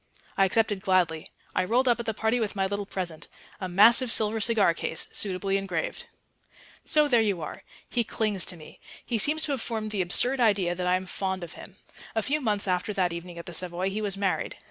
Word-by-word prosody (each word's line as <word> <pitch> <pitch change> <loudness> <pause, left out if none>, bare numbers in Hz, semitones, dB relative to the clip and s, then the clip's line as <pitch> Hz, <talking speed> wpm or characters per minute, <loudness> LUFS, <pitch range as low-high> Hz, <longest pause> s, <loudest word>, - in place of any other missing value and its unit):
I 195 - +4
accepted 205 0 +1
gladly. 175 -5 +1 0.3
I 185 - +1
rolled 240 +7 +1
up 240 -1 +3
at 235 - -5
the 220 - 0
party 220 +3 +1
with 215 -3 -2
my 195 -1 +1
little 200 +1 -3
present...a 180 +2 -7
massive 230 +6 +6
silver 220 0 +2
cigar 210 -6 +3
case...suitably 195 +4 -1
engraved. 185 -4 -4 0.8
So 300 -1 +3
there 240 -5 +4
you 200 -5 0
are. 155 - -7 0.3
He 240 - 0
clings 215 -3 0
to 180 - -2
me. 155 - -14 0.3
He 235 -3 -1
seems 310 +7 +2
to 295 - -1
have 270 -4 -1
formed 220 -2 -3
the 205 -3 0
absurd 245 +9 +3
idea 200 -7 +3
that 180 0 -3
I 180 - +3
am 185 0 -3
fond 190 0 -3
of 170 - -8
him. - - -12 0.4
A 220 - +1
few 300 +5 0
months 210 -5 0
after 185 +3 0
that 180 -3 0
evening 170 0 -8
at 170 - -8
the 175 - -8
Savoy 180 +2 -1
he 215 +2 -3
was 200 -2 -1
married. 195 -2 -1
200 Hz, 210 wpm, -27 LUFS, 180-225 Hz, 0.8 s, massive